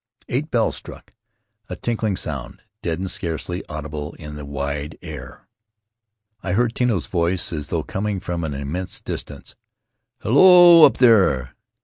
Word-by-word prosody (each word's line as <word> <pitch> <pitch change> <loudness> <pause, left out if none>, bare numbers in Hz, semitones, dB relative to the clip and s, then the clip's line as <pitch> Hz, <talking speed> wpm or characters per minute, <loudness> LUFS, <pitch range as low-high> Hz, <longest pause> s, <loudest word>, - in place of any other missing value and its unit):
Eight 145 +6 -2
bells 115 -5 +1
struck, - - -12 0.6
a - - -4
tinkling 110 -4 -2
sound, 70 -5 -5 0.2
deadened, 90 +2 -3
scarcely 85 +2 -4
audible 75 0 -6
in 75 -2 -9
the 75 -1 -8
wide 70 +2 -4
air. - - -10 0.9
I 90 - -3
heard 120 +3 +1
Tino's 115 - 0
voice 90 +3 -1
as 75 -2 -4
though 80 -1 -2
coining 105 +1 -3
from 85 -2 -4
an 75 -3 -3
immense 75 +7 -5
distance: - - -7 0.7
"Hello, 175 - +8
up 125 - +3
there! 95 - +3
90 Hz, 135 wpm, -21 LUFS, 75-115 Hz, 0.9 s, Hello